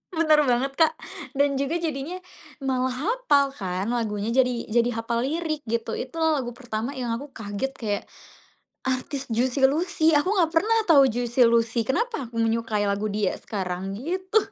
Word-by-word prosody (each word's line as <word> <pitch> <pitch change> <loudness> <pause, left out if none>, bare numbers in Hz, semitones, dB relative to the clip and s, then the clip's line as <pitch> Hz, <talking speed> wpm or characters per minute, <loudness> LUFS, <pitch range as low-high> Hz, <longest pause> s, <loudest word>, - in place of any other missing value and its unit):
Bener 310 -2 +4
banget, 250 +2 +1
Kak, 320 - +4 0.4
dan 280 0 +2
juga 280 +4 -1
jadinya 320 -1 -3 0.5
malah 260 -1 +1 0.2
hafal 385 - +2
kan 190 -3 -3
lagunya. 220 -2 -1
Jadi 250 -1 +2
jadi 235 +1 +3
hafal 235 +2 -1
lirik 315 0 -2
gitu, 230 0 -2
itu 255 +5 -5
lagu 300 -7 0
pertama 240 +1 -4
yang 245 -3 -3
aku 245 +6 -4
kaget 205 +5 -3
kayak, 205 -3 -2 0.8
artis 265 +1 -2
Juicy 255 +3 +2
Luicy 320 +2 +2
aku 295 +4 +3
nggak 360 -6 +2
pernah 435 +8 +3
tahu 285 -7 +6
Juicy 240 +1 -1
Luicy 230 0 +2
kenapa 440 - -1
aku 235 - -14
menyukai 225 -2 0
lagu 200 +1 -1
dia 205 -2 0
sekarang 190 -1 -4
gitu. 370 - -1
255 Hz, 155 wpm, -25 LUFS, 230-305 Hz, 0.8 s, tahu